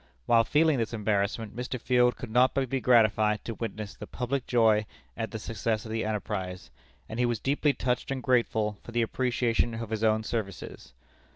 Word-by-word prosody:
While 115 -1 +5
feeling 155 -2 +3
this 115 0 -2
embarrassment, 105 +1 -1
Mr. 125 +1 -4
Field 125 0 +3
could 120 - -7
not 125 +3 +4
but 135 -2 0
be 135 -1 0
gratified 110 -3 +3
to 115 - -3
witness 110 -2 -5
the - - -9
public 125 +1 -3
joy 110 -3 +3 0.3
at 110 - -3
the 110 - -5
success 110 0 -2
of 110 - -7
the 115 0 -1
enterprise, 95 -4 -4 0.4
and 110 - -6
he 125 - +3
was 120 -3 -1
deeply 145 +3 +1
touched 125 -1 -2
and 135 -2 -3
grateful 110 -5 +1
for 115 - -11
the 120 0 +2
appreciation 120 -1 0
of 115 -1 -6
his 110 0 -2
own 110 0 +3
services. 100 - -5
115 Hz, 190 wpm, -28 LUFS, 110-125 Hz, 0.4 s, While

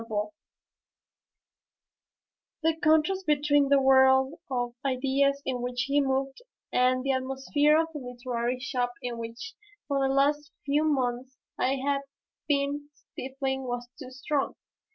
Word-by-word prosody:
The 325 0 +3
contrast 315 +5 +2
between 290 -1 +3
the 280 0 +5
world 265 0 +5 0.2
of 245 -2 -2
ideas 275 +1 +1
in 250 -2 -2
which 245 0 -2
he 280 +2 +2
moved 270 - -1 0.3
and 255 0 +3
the 275 - +1
atmosphere 270 +3 +2
of 325 0 0
the 300 - -5
literary 245 -1 -3
shop 245 -1 -2
in 240 -1 -4
which 230 +11 -7 0.3
for 280 -1 0
the 270 0 +2
last 290 +2 +1
few 290 +2 +2
months 260 -3 -1 0.2
I 265 +2 +2
had 275 +1 0 0.5
been 290 0 0
stifling 265 0 -5
was 245 -1 -4
too - - -8
strong. 270 +2 -2
270 Hz, 130 wpm, -28 LUFS, 255-285 Hz, 0.5 s, the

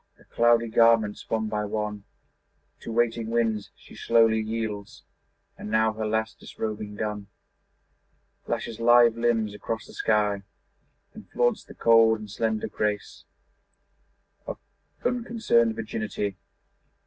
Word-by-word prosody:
Her - - -22
cloudy 120 0 +3
garments 115 -2 +3
one 110 -1 0
by 105 -1 -2
one 105 -1 -4 0.7
To - - -7
waiting 115 -1 0
winds 115 -3 0
she - - -16
slowly 115 -1 +3
yields, 110 -2 -4 0.6
And - - -7
now, 110 0 +2
her 110 0 -3
last 110 +1 -2
disrobing 105 -1 -5
done, 105 -1 -4 1.2
Flashes 115 - -4
lithe 120 0 +6
limbs 115 -3 0
across 110 +2 -5
the - - -14
sky 105 -2 +1 0.7
And - - -13
flaunts 120 0 +1
the - - -14
cold 115 -1 +5
and 105 -2 -10
slender 110 0 -1
grace 105 -1 -3 1.2
Of - - -5 0.5
unconcerned 230 - +1
virginity. 105 -2 -3
110 Hz, 120 wpm, -26 LUFS, 105-115 Hz, 1.2 s, lithe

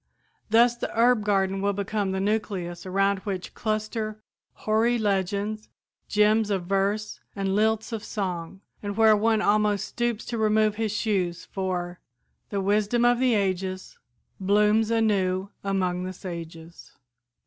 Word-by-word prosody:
Thus 235 +2 +5
the - - -4
herb 240 -2 +4
garden 195 -1 +1
will 200 0 +1
become 200 0 -2
the 190 - -2
nucleus 195 -4 -2
around 195 +1 +1
which 190 -2 -5
cluster 215 0 -3 0.5
hoary 225 +3 +2
legends, 205 +1 -1 0.4
gems 210 +1 +3
of 190 -3 -1
verse 200 +3 -1 0.2
and 195 -1 -1
lilts 220 +1 +1
of 220 -2 -4
song, 185 -2 -4 0.2
and 205 0 -5
where 220 -1 +6
one 220 +1 +2
almost 210 -1 +2
stoops 240 -2 -2
to 235 -2 -4
remove 215 0 +3
his 220 -2 -1
shoes, 185 -5 -1
for 180 -2 -3 0.5
"The 200 -1 -2
wisdom 210 +4 +2
of 240 0 +4
the 255 -3 +3
ages 190 -1 -2 0.4
Blooms 210 +3 +3
anew 200 -4 +1
among 185 -2 -1
the 185 - -5
sages." 170 -2 -9
205 Hz, 135 wpm, -26 LUFS, 190-215 Hz, 0.5 s, where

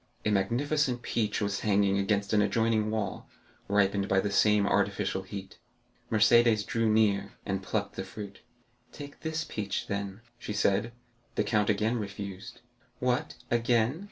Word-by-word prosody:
A 105 - +2
magnificent 125 +6 +1
peach 105 -3 -1
was 100 -1 -1
hanging 100 -1 +2
against 100 0 0
an 105 - +5
adjoining 110 +1 +1
wall, 110 -1 -3 0.4
ripened 100 -1 +2
by 95 - +4
the 100 +1 -1
same 105 0 +4
artificial 100 -1 0
heat. 95 0 -9 0.5
Mercédès 110 0 +5
drew 115 -1 0
near, 100 -2 +2
and 95 -1 -2
plucked 100 +1 -3
the 95 - -2
fruit. 100 +1 -9 0.5
"Take 145 -1 -10
this 160 0 -2
peach, 100 -7 -3
then," 100 +1 -4 0.2
she 105 - -5
said. 105 +2 +1 0.4
The - - +2
count 105 0 +1
again 110 +3 +1
refused. 100 +3 -7 0.4
"What, 125 0 -1 0.2
again?" 120 +4 +2
105 Hz, 145 wpm, -29 LUFS, 100-115 Hz, 0.5 s, an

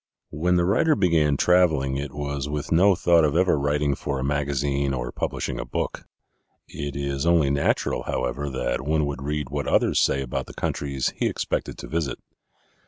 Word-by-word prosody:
When 90 +4 +1
the 85 0 +3
writer 130 - +3
began 80 -7 +2
traveling 80 -7 +3
it 70 0 -4
was 70 -1 -4
with 75 +1 -4
no 95 +4 +5
thought 85 -2 +4
of 75 0 +1
ever 90 -1 +3
writing 70 0 +1
for 70 +1 -3
a 65 - -3
magazine 70 -1 0
or - - -4
publishing - - -3
a - - -2
book. - - -4 0.6
It 70 -1 -6
is 70 +1 -2
only 80 -5 +4
natural, 70 0 0
however, 65 +3 -2
that 60 -2 -2
one 75 +1 +1
would 70 -1 -4
read 75 -1 -3
what 70 -1 -3
others - - +2
say 70 - +2
about 65 - -4
the - - -11
countries 70 -2 -2
he - - 0
expected - - -3
to - - -8
visit. 80 -4 -2
70 Hz, 180 wpm, -24 LUFS, 70-80 Hz, 0.6 s, no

